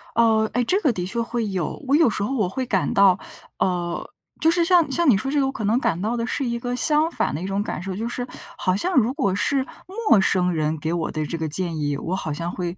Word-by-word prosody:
呃， 220 -2 +3
哎， 245 0 +1
这 380 - +2
个 285 - +3
的 180 -2 -3
确 235 +5 -2
会 230 -1 -2
有。 185 - -3
我 280 - +3
有 315 -6 +5
时 200 - -2
候 270 +6 -2
我 210 -7 +1
会 255 +5 -3
感 195 -6 0
到， 195 -2 +5 0.4
呃， 175 -2 -1 0.3
就 320 - +4
是 340 0 +3
像 340 -4 +4
像 335 +2 +3
你 205 - +5
说 270 +6 -3
这 295 - +1
个， 270 - +2
我 270 - -1
可 225 - -6
能 220 +5 +2
感 205 -9 -1
到 225 +3 -1
的 230 - -1
是 270 +3 -2
一 235 -1 -2
个 245 +1 -3
相 305 +4 +3
反 - - -1
的 155 - -4
一 - - -4
种 195 +1 -1
感 - - -4
受。 190 -1 -4
就 225 +4 -3
是 245 +1 -4 0.3
好 185 -1 +1
像 360 - 0
如 250 -1 +3
果 200 - 0
是 270 +5 +1 0.4
陌 205 - +7
生 180 -2 +2
人 155 0 -1
给 160 +2 -2
我 170 -2 -2
的 155 -1 -2
这 165 - -4
个 160 -1 -2
建 170 +1 -1
议， 145 -1 -1
我 180 +5 -3
好 155 -6 -3
像 170 +3 -3
会 175 0 -4
215 Hz, 290 characters per minute, -23 LUFS, 180-260 Hz, 0.4 s, 陌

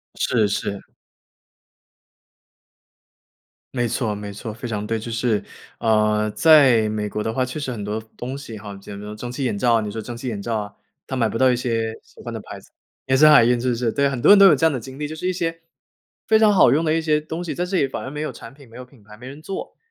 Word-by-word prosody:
是 110 -4 +1
是。 100 0 -3 2.9
没 120 -2 0
错 115 -2 -2
没 105 0 -7
错， 105 +2 -7
非 120 +4 -9
常 105 -2 -4
对， 115 - -1
就 115 +2 -6
是， 115 -2 0 0.4
呃， 105 -1 +2
在 135 -7 +5
美 105 -1 -3
国 105 - -4
的 110 +1 -2
话 130 - 0
确 130 +4 -5
实 145 - -4
很 110 -4 -5
多 105 +2 -3
服 110 - -15
东 130 +3 -6
西 125 -6 -9
哈， 100 0 -9
也没有 100 +1 -9
蒸 115 +3 -7
汽 130 +3 -4
眼 120 -5 -1
罩， 120 +3 +3
啊， 115 - +2
你 105 -1 -4
说 110 - -5
蒸 120 +2 -7
汽 125 +2 -5
眼 105 -4 -5
罩 115 +1 -2
啊， 105 -1 -6 0.3
它 130 - -4
买 115 -2 +2
不 110 - -3
到 130 +1 +4
一 - - +2
些 115 -2 -2
喜 - - -18
欢 - - -7
的 - - -5
牌 - - -10
子， - - -22 0.4
也 130 - +3
是 155 +3 +7
海 150 -5 +8
运 120 +1 +2
是 125 +2 -1
不 120 - 0
是？ 115 -1 -1
对， 140 +3 +1
很 130 -3 -4
多 - - +4
人 205 - +8
都 200 - +9
有 160 - +6
这 155 - +1
样 160 - +4
的 130 - -3
经 130 +4 -10
历， 150 - -3
就 155 +2 -6
是 170 +3 -4
一 185 - 0
些 165 -2 -3 0.7
非 220 0 +4
常 215 -1 +5
好 185 - +6
用 155 +5 +2
的 155 - +2
一 165 - +1
些 155 -1 +1
东 160 +3 -6
西， 175 - -4
在 180 - -2
这 185 +1 -1
里 135 - +2
反 - - -5
而 - - -6
没 150 +2 -6
有 155 - -3
产 115 - -12
品、 140 -3 -18
没 115 - -13
有 125 - -9
品 125 -4 -22
牌、 105 +1 -15
没 125 +3 -11
人 140 +3 -10
做。 190 +4 -7
120 Hz, 295 characters per minute, -22 LUFS, 110-145 Hz, 2.9 s, 都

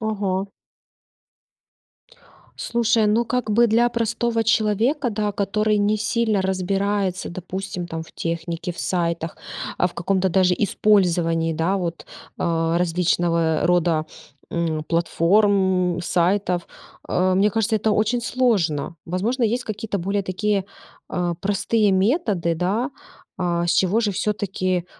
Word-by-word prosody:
Ага. 200 -3 -1 2.1
Слушай, 230 -2 +1
ну 225 +3 +2
как 250 -3 -1
бы 235 +3 +5
для 230 +2 +3
простого 230 0 0
человека, 225 +5 +1
да, 210 -1 -1
который 210 +1 0
не 205 +1 +1
сильно 220 -2 +1
разбирается, 190 0 -1
допустим, 185 0 -5
там 165 -1 -5
в - - -14
технике, 170 +1 -4
в - - -16
сайтах, 170 -2 -2 0.4
а, 180 - +2
в 180 - -6
каком-то 190 +2 0
даже 185 0 +3
использовании, 175 -6 +2
да 165 +5 0
вот, 170 -3 -4 0.3
а, 165 0 +1
различного 170 -2 +1
рода, 170 -3 +2 0.4
м, 165 -2 -1
платформ, 185 +2 +2
м, - - -3
сайтов. 180 +1 0 0.4
Э, 185 +1 +2
мне 200 +3 +3
кажется, 220 +1 +1
это 215 +1 0
очень 220 +4 +1
сложно. 190 - 0
Возможно, 215 +9 -1
есть 240 +3 +1
какие-то 215 -1 -4
более 200 +3 -1
такие, 195 +1 -1 0.4
а, 175 -1 -1
простые 205 +3 +1
методы, 195 - +1
да, 200 - -1 0.5
а, 175 -2 0
с 170 - +1
чего 195 +4 +2
же 210 -3 0
всё-таки, 185 -3 -1
190 Hz, 125 wpm, -22 LUFS, 175-215 Hz, 2.1 s, бы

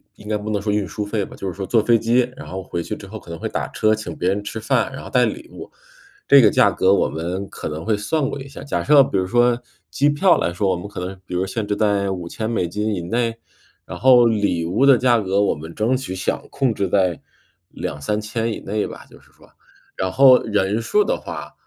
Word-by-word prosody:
应 105 - -12
该 105 - +1
不 105 +1 -6
能 105 -2 -1
说 105 0 -1
运 105 -3 0
输 105 +5 -4
费 105 -1 -2
吧， - - -12
就 - - -8
是 - - -6
说 95 +1 -5
坐 110 0 +2
飞 115 -1 +4
机， 120 +2 +1
然 - - -9
后 95 0 -6
回 85 -1 -4
去 - - -5
之 100 - -11
后 110 +3 -8
可 - - -17
能 85 - -6
会 - - -4
打 - - -3
车， 110 0 +2
请 105 -7 -5
别 90 - 0
人 100 +2 0
吃 105 +2 -6
饭， 125 +2 +1
然 - - -8
后 - - -9
带 125 -1 +3
礼 330 +2 -5
物， - - -10 0.6
这 140 - +7
个 110 - +6
价 100 - +4
格 95 +2 +3
我 - - +2
们 90 +5 -4
可 - - -7
能 80 +1 -5
会 110 -1 0
算 135 +7 -1
过 140 - -5
一 135 - -9
下。 135 -1 -10
假 115 -12 -2
设 140 +8 +6
比 100 - -2
如 95 0 0
说 120 +2 +2 0.3
机 145 +2 +2
票 170 +5 +4
来 85 - -1
说， 95 +2 0
我 90 - +1
们 90 - -7
可 100 - -7
能 95 0 -7
比 90 - -6
如 90 +2 0
限 100 +2 -4
制 105 - 0
在 100 -2 +1
5000 95 +5 -4
美 115 -6 0
金 105 +3 -2
以 90 - -4
内， 115 +6 -1 0.5
然 - - -8
后 125 -2 +6
礼 105 -7 +1
物 95 +11 +1
的 135 -2 +7
价 120 -2 +3
格 100 -1 0
我 100 - +2
们 80 +3 -10
争 115 +4 +1
取 125 -8 -6
想 95 - -3
控 135 -5 0
制 100 -2 -1
在 90 -4 +1 0.5
2000-3000 105 +9 -3
以 - - -7
内 105 +2 -2
吧， - - -10
就 - - -16
是 - - -25
说。 - - -20 0.5
然 95 0 -1
后 130 -2 +6
人 105 0 0
数 210 - +2
的 - - 0
话， - - -8
105 Hz, 270 characters per minute, -21 LUFS, 95-120 Hz, 0.6 s, 这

